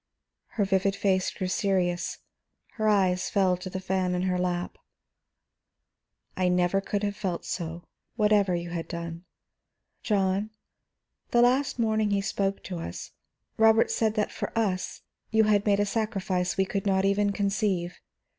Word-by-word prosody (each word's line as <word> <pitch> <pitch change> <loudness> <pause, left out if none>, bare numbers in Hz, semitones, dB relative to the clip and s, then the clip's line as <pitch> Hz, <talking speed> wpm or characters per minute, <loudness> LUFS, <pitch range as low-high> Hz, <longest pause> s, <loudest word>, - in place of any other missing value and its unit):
Her 205 - +3
vivid 195 0 +1
face 190 -2 +1
grew 190 - -5
serious, 185 -2 0 0.5
her 215 -1 0
eyes 185 -3 +2
fell 190 -3 +3
to 185 +1 -7
the 190 - -4
fan 185 -1 -1
in 180 - -1
her 180 -1 0
lap. 180 -1 -2 1.6
"I 185 - 0
could 180 - +3
never 180 +2 +2 0.2
have 205 0 -1
felt 190 -5 -3
so, 170 -1 -4 0.3
whatever 210 -4 +3
you 170 0 -4
had 165 -2 -4
done. 170 +1 -6 0.8
John, 200 0 +1 0.8
the 240 0 +4
last 260 +3 +2
morning 220 -2 +1
he 200 -1 +1
spoke 195 0 -2
to 180 -3 -5
us, 85 - -7 0.5
Robert 225 0 +5
said 220 -1 +1
that 210 -2 0
for - - -4
us 195 -5 -1 0.3
you 220 0 +4
had 210 -1 +2
made 200 -1 +3
a 205 - +3
sacrifice 195 -5 -1
we 190 - +3
could 195 +1 -3
not 190 0 +2
even 200 +1 +2
conceive. 195 -3 -1
195 Hz, 155 wpm, -27 LUFS, 180-210 Hz, 1.6 s, Robert